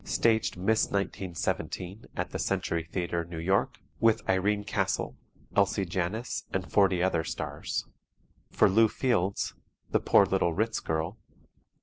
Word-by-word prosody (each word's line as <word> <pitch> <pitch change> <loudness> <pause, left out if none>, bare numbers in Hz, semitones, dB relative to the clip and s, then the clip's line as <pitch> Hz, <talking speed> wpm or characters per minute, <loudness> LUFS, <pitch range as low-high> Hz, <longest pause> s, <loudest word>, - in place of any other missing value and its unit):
Staged 110 -5 +1
"Miss 110 +5 +2
1917" 95 0 -3
at - - -2
the - - -4
Century 85 -1 -1
Theatre, 85 -2 -1
New 85 0 -8
York, 95 +4 +1 0.2
with 115 -1 +3
Irene 100 +2 +2
Castle, 100 - -1 0.4
Elsie 100 0 +2
Janis 95 +7 -2
and 95 -2 -3
40 95 -3 +4
other 85 -3 +1
stars. - - -4 0.6
For - - +4
Lew 110 +4 +5
Fields: 100 -6 0 0.4
"The - - +3
Poor - - +5
Little 85 - +1
Ritz 110 +2 0
Girl." 80 +7 -2
95 Hz, 130 wpm, -29 LUFS, 85-105 Hz, 0.6 s, Lew